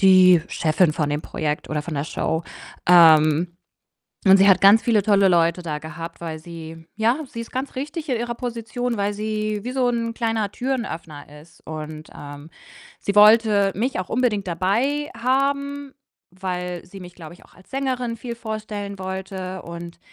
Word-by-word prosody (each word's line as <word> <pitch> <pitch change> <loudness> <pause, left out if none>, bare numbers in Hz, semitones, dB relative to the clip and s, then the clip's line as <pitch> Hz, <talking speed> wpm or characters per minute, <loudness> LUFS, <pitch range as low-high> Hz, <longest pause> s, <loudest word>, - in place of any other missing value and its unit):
die 185 -3 +7
Chefin 160 0 +2
von 150 -2 -1
dem 145 +1 -1
Projekt 150 -2 -3
oder 150 -1 -2
von 160 0 -6
der 140 +1 -2
Show. 160 0 -2 0.5
Ähm, 165 0 +6 0.7
und 190 0 +7
sie 195 +1 +6
hat 190 -2 +6
ganz 200 +3 +7
viele 220 -4 +2
tolle 200 -2 +4
Leute 170 0 +2
da 150 -3 -3
gehabt, 165 +2 -8
weil 160 -2 -5
sie 165 -1 -10
ja, 230 +4 +2
sie 230 - -9
ist 230 - -9
ganz 260 +1 -4
richtig 300 +3 -5
in 250 - +1
ihrer 240 0 -3
Position, 240 0 -4
weil 200 0 0
sie 215 0 -2
wie 250 - -4
so 255 -2 +1
'n 230 -1 -1
kleiner 225 -3 -1
Türen-Öffner 165 - -5
ist 165 +2 -20
und, 155 0 -7
ähm, 145 +2 -10 0.5
sie 200 +1 -3
wollte 210 -2 +6
mich 245 +4 -1
auch 185 - -4
unbedingt 225 -5 0
dabei 230 - 0
haben, 280 +2 0 0.4
weil 180 -1 -5
sie 190 +2 -12
mich, 180 -1 -11
glaube 165 -1 -10
ich, - - -19
auch - - -22
als 185 - -20
Sängerin 255 -3 -2
viel 235 0 -6
vorstellen 215 -3 -5
wollte 190 0 -5
und 170 0 -9
195 Hz, 175 wpm, -22 LUFS, 170-230 Hz, 0.7 s, die